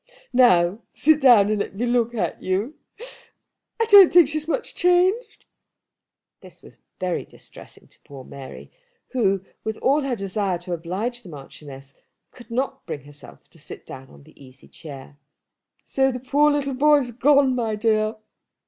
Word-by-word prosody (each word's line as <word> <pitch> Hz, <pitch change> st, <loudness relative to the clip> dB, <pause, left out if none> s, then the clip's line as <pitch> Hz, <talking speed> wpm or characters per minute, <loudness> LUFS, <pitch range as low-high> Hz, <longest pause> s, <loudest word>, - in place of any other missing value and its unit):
"Now 190 Hz, -6 st, +4 dB
sit 310 Hz, 0 st, +2 dB
down, 220 Hz, -6 st, +5 dB
and 215 Hz, -, -1 dB
let 200 Hz, -, -5 dB
me 235 Hz, +5 st, -2 dB
look 240 Hz, -1 st, 0 dB
at 180 Hz, -7 st, -3 dB
you. 195 Hz, +9 st, -2 dB, 1.1 s
I 455 Hz, -, +2 dB
don't 405 Hz, -5 st, +8 dB
think 345 Hz, -4 st, +6 dB
she's 310 Hz, +1 st, -3 dB
much 455 Hz, +9 st, -3 dB
changed." 365 Hz, +6 st, +1 dB, 0.9 s
This -, -, -17 dB
was -, -, -17 dB, 0.2 s
very 180 Hz, -2 st, -2 dB
distressing -, -, -15 dB
to -, -, -22 dB
poor 135 Hz, -2 st, -12 dB
Mary, 135 Hz, 0 st, -12 dB, 0.4 s
who, 195 Hz, -6 st, 0 dB, 0.2 s
with 220 Hz, 0 st, -4 dB
all 285 Hz, +3 st, +1 dB
her 270 Hz, -3 st, -2 dB
desire 195 Hz, -2 st, -3 dB
to 175 Hz, +1 st, -7 dB
oblige 190 Hz, +9 st, -4 dB
the 195 Hz, -, -14 dB
Marchioness 135 Hz, -2 st, -12 dB, 0.4 s
could 245 Hz, -2 st, -16 dB
not 255 Hz, +4 st, -3 dB
bring 145 Hz, -, -6 dB
herself 145 Hz, -3 st, -15 dB
to 165 Hz, -, -17 dB
sit -, -, -11 dB
down 135 Hz, 0 st, -11 dB
in -, -, -17 dB
the 155 Hz, -1 st, -19 dB
easy 130 Hz, 0 st, -17 dB
chair. 145 Hz, -2 st, -12 dB, 0.7 s
"So 270 Hz, 0 st, +1 dB
that 250 Hz, 0 st, -8 dB
poor 290 Hz, +3 st, +3 dB
little 285 Hz, -2 st, -1 dB
boy 295 Hz, +3 st, +4 dB
has 255 Hz, -4 st, -3 dB
gone, 275 Hz, +2 st, +3 dB
my 230 Hz, -3 st, -2 dB
dear?" 215 Hz, 0 st, 0 dB
225 Hz, 165 wpm, -22 LUFS, 175-275 Hz, 1.1 s, don't